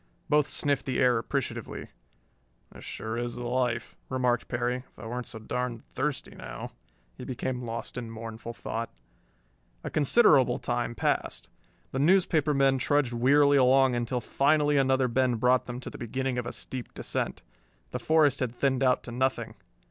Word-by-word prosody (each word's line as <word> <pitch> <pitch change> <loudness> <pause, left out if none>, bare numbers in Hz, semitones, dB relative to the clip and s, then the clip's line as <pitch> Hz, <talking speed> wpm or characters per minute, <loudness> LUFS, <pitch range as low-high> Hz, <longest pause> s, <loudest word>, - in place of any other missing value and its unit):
Both 150 -1 +4
sniffed 140 -3 -1
the 130 - -1
air 125 -3 +4
appreciatively. - - -4 0.8
"This - - -13
is - - -11
sure 110 +2 -4
the 120 0 -4
life," 120 -2 -1
remarked 125 -2 +1
Perry. 120 +1 -1
"If 125 - -15
I - - -9
weren't 120 +2 -4
so 110 - -7
darn 120 +1 -3
thirsty 150 -2 -3
now...." - - -8 0.5
He - - -6
became 125 0 -3
lost 115 +2 -5
in 115 -2 -6
mournful 115 +1 -7
thought. 115 +1 -4 0.9
A - - -5
considerable 140 - +5
time 120 -1 -2
passed. - - -1 0.4
The 135 - -2
newspaper 160 -2 +3
men 135 -1 +3
trudged 130 0 +1
wearily 140 +4 +5
along 130 0 +5
until 120 +1 -1
finally 145 +3 +2
another 130 -1 +3
bend 125 -1 +1
brought 125 +2 +3
them 125 0 -5
to - - -7
the - - -10
beginning 130 +2 -2
of 120 - -4
a - - -3
steep 130 -2 -7
descent. - - -3 0.5
The - - -3
forest 155 -4 +3
had 125 -2 -2
thinned 135 0 +1
out 130 -1 +3
to 120 - -8
nothing. 120 -2 -1
125 Hz, 165 wpm, -28 LUFS, 120-135 Hz, 0.9 s, considerable